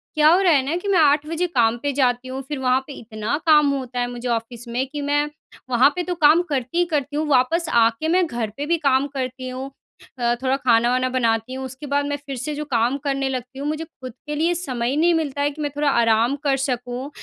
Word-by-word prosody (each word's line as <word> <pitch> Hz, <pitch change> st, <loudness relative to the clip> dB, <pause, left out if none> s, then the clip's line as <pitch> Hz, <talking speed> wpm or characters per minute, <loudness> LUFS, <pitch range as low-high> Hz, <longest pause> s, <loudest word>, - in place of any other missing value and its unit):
क्या 305 Hz, 0 st, +5 dB
हो 355 Hz, +3 st, +5 dB
रहा 350 Hz, -4 st, +4 dB
है 270 Hz, -2 st, +3 dB
ना? 315 Hz, +5 st, -1 dB
कि 400 Hz, -, -6 dB
मैं 380 Hz, -4 st, +3 dB
8 295 Hz, 0 st, +4 dB
बजे 330 Hz, +2 st, -1 dB
काम 235 Hz, -7 st, +2 dB
पे 285 Hz, -, 0 dB
जाती 245 Hz, 0 st, +1 dB
हूँ 265 Hz, +1 st, -5 dB
फिर 295 Hz, -3 st, -4 dB
वहाँ 255 Hz, 0 st, +2 dB
पे 285 Hz, -, -8 dB
इतना 220 Hz, +4 st, -3 dB
काम 300 Hz, -2 st, +5 dB
होता 255 Hz, -2 st, -4 dB
है 245 Hz, -, 0 dB
मुझे 245 Hz, +1 st, -6 dB
ऑफ़िस 235 Hz, +1 st, -3 dB
में 245 Hz, +3 st, -1 dB
कि 295 Hz, +1 st, -6 dB
मैं, 290 Hz, +1 st, 0 dB, 0.4 s
वहाँ 250 Hz, +3 st, +5 dB
पे 360 Hz, -, -1 dB
तो 360 Hz, 0 st, -3 dB
काम 320 Hz, +1 st, +5 dB
करती 270 Hz, +3 st, -2 dB
ही 350 Hz, -, +3 dB
करती 295 Hz, -4 st, -2 dB
हूँ, 305 Hz, +1 st, -1 dB
वापस 300 Hz, +5 st, +2 dB
आके 230 Hz, +5 st, +3 dB
मैं 360 Hz, +2 st, +3 dB
घर 235 Hz, -4 st, -3 dB
पर 290 Hz, -, -3 dB
भी 335 Hz, +1 st, +2 dB
काम 275 Hz, -2 st, +2 dB
करती 255 Hz, -1 st, -4 dB
हूँ। 260 Hz, +2 st, -6 dB, 0.5 s
अ, 240 Hz, 0 st, +1 dB
थोड़ा 260 Hz, +1 st, +2 dB
खाना-वाना 250 Hz, 0 st, +2 dB
बनाती 230 Hz, -1 st, 0 dB
हूँ, 265 Hz, 0 st, -5 dB
उसके 260 Hz, +3 st, -9 dB
बाद 285 Hz, +1 st, 0 dB
मैं 290 Hz, -, -2 dB
फिर 275 Hz, -, -5 dB
से 280 Hz, +5 st, -3 dB
जो 300 Hz, -, -4 dB
काम 245 Hz, -1 st, +1 dB
करने 275 Hz, -1 st, -2 dB
लगती 255 Hz, +1 st, -5 dB
हूँ, 285 Hz, -, -3 dB
मुझे 310 Hz, +1 st, -2 dB
ख़ुद 255 Hz, -6 st, -11 dB
के 295 Hz, -, -3 dB
लिए 330 Hz, +4 st, +1 dB
समय 250 Hz, -8 st, -2 dB
ही 275 Hz, -, -1 dB
नहीं 340 Hz, +2 st, +4 dB
मिलता 290 Hz, -4 st, -1 dB
है, 290 Hz, -, +1 dB
कि 305 Hz, +2 st, -9 dB
मैं 295 Hz, -, -1 dB
थोड़ा 290 Hz, -1 st, +1 dB
आराम 230 Hz, +1 st, +3 dB
कर 275 Hz, -2 st, +2 dB
सकूँ। 250 Hz, 0 st, -3 dB
270 Hz, 250 wpm, -22 LUFS, 245-300 Hz, 0.5 s, क्या